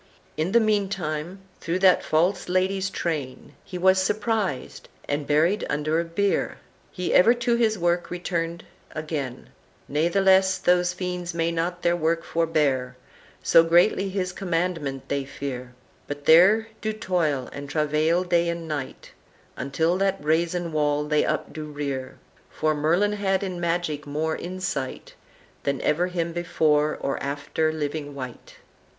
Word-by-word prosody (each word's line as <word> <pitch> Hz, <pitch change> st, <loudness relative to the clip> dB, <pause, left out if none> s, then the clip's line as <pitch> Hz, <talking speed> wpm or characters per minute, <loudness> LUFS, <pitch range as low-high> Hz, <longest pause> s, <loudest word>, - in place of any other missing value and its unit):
"In 160 Hz, +4 st, -1 dB
the 235 Hz, -, +6 dB
mean 210 Hz, -3 st, +1 dB
time, 175 Hz, -1 st, -4 dB, 0.2 s
through 170 Hz, +1 st, -1 dB
that 185 Hz, -1 st, +5 dB
false 180 Hz, +4 st, +1 dB
lady's 190 Hz, +1 st, +1 dB
train, 150 Hz, -9 st, -4 dB
He 180 Hz, -, -7 dB
was 190 Hz, +1 st, +4 dB
surprised, 205 Hz, -, -2 dB, 0.2 s
and 145 Hz, 0 st, -2 dB
buried 165 Hz, +8 st, +2 dB
under 155 Hz, +3 st, 0 dB
beare, 190 Hz, +4 st, 0 dB, 0.3 s
He 180 Hz, -1 st, -2 dB
ever 230 Hz, +7 st, +6 dB
to 240 Hz, 0 st, +1 dB
his 225 Hz, -2 st, +2 dB
work 175 Hz, 0 st, 0 dB
returned 170 Hz, -1 st, -3 dB, 0.3 s
again; 150 Hz, -5 st, -5 dB, 0.4 s
Nathless 190 Hz, +5 st, +3 dB
those 180 Hz, -1 st, +2 dB
fiends 180 Hz, -1 st, -4 dB
may 165 Hz, 0 st, +1 dB
not 170 Hz, +2 st, -2 dB
their 175 Hz, 0 st, +3 dB
work 165 Hz, 0 st, 0 dB
forbear, 145 Hz, -6 st, 0 dB, 0.5 s
So 165 Hz, -, +6 dB
greatly 175 Hz, +4 st, +3 dB
his 185 Hz, -1 st, -2 dB
commandement 165 Hz, -7 st, -2 dB
they 140 Hz, -1 st, -1 dB
fear; 130 Hz, -2 st, -6 dB, 0.3 s
But 145 Hz, 0 st, -6 dB
there 195 Hz, +8 st, +6 dB
do 215 Hz, +1 st, -1 dB
toil 165 Hz, -, -1 dB
and 140 Hz, 0 st, -7 dB
travail 155 Hz, +3 st, +1 dB
day 170 Hz, -1 st, +2 dB
and 170 Hz, -1 st, -4 dB
night, 145 Hz, -4 st, -5 dB, 0.4 s
Until 160 Hz, +7 st, 0 dB
that 195 Hz, 0 st, +1 dB
brazen 170 Hz, +2 st, 0 dB
wall 150 Hz, -1 st, +1 dB
they 150 Hz, 0 st, +2 dB
up -, -, -2 dB
do 155 Hz, -1 st, -5 dB
rear. 140 Hz, -3 st, -5 dB, 0.3 s
For 155 Hz, 0 st, 0 dB
Merlin 170 Hz, +8 st, +2 dB
had 195 Hz, -2 st, 0 dB
in 185 Hz, -3 st, -4 dB
magic 165 Hz, -4 st, -1 dB
more 155 Hz, +2 st, -1 dB
insight 180 Hz, -7 st, -4 dB, 0.5 s
Than 140 Hz, -1 st, -1 dB
ever 175 Hz, +4 st, +1 dB
him 170 Hz, -2 st, -2 dB
before 155 Hz, -3 st, +1 dB
or 140 Hz, -, -2 dB
after 145 Hz, +3 st, -1 dB
living 145 Hz, -1 st, -4 dB
wight." 130 Hz, -3 st, -8 dB
170 Hz, 145 wpm, -25 LUFS, 150-185 Hz, 0.5 s, the